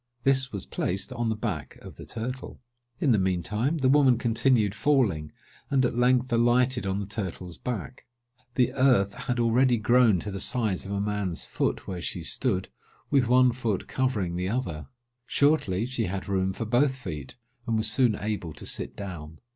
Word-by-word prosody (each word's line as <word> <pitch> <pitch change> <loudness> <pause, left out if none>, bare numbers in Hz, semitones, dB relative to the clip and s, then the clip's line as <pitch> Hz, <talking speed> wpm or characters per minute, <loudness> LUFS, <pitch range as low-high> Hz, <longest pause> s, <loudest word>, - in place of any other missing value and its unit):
This 135 -1 +3
was 100 -3 -5
placed 95 +7 -2
on 120 -2 -1
the 110 - 0
back 110 - -4
of - - -12
the - - -10
turtle. 125 +3 -6 0.4
In 140 - +2
the 110 - +4
mean 95 -2 0
time, 115 - -1
the 135 -4 +1
woman 135 -3 +5
continued 115 -2 +2
falling, 105 - +1 0.4
and, 135 -2 +3
at 125 - 0
length, 125 0 +2
alighted 120 0 +2
on 95 +1 -1
the 100 - -3
turtle's 95 -4 -5
back. 105 - -5 0.5
The 125 -2 +2
earth 125 -7 +3
had 125 +2 -3
already 120 +2 +3
grown 115 -3 +4
to 105 - -5
the 100 - -5
size 110 -6 0
of - - -6
a 100 - -1
man's 100 -4 -2
foot, - - -2
where 90 -2 -4
she 85 0 -3
stood, 95 +1 -1 0.4
with 135 -4 +3
one 125 +1 +5
foot 115 -5 -2
covering 105 -10 -1
the 90 +1 -1
other. 95 - -3 0.4
Shortly, 130 -10 +2
she 125 -3 -2
had 95 +1 -4
room 95 -1 0
for 115 - -4
both 130 +4 +2
feet, 80 - -7 0.3
and 115 -1 +1
was 110 - +1
soon 110 +1 +3
able 105 -6 -4
to - - -8
sit - - -1
down. 85 -6 -7
110 Hz, 185 wpm, -27 LUFS, 95-125 Hz, 0.5 s, woman